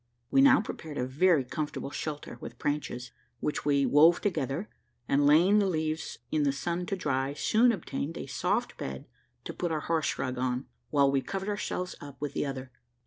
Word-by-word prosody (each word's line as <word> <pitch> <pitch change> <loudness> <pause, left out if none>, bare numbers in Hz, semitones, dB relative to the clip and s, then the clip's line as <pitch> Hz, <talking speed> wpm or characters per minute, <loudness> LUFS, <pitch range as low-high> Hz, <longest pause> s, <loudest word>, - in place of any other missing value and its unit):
We 270 - +5
now 270 -2 +7
prepared 155 -7 -7
a 125 - 0
very 150 +3 +3
comfortable 150 0 -4
shelter 150 -1 -5
with - - -8
branches, 135 -4 -3 0.3
which 150 - -2
we 140 -1 +3
wove 160 +4 +6
together, 170 -1 -1 0.4
and 145 +1 +3
laying 175 +8 +6
the 200 - +2
leaves 155 -2 -2
in 155 - +2
the 145 -1 +3
sun 170 +5 -3
to 195 - -1
dry, 140 -5 -1
soon 235 +9 +4
obtained 165 -5 -4
a - - -5
soft - - -1
bed 65 -1 -5 0.4
to - - -6
put 175 -2 -2
our 155 -1 -1
horse 160 -2 0
rug 125 -1 -2
on, 125 +1 -1 0.2
while 140 -2 +4
we 135 -1 +2
covered 195 +5 -4
ourselves 185 -3 -2
up 140 -3 -10
with 145 -1 -3
the - - -1
other. 130 -1 -6
150 Hz, 190 wpm, -29 LUFS, 140-175 Hz, 0.4 s, now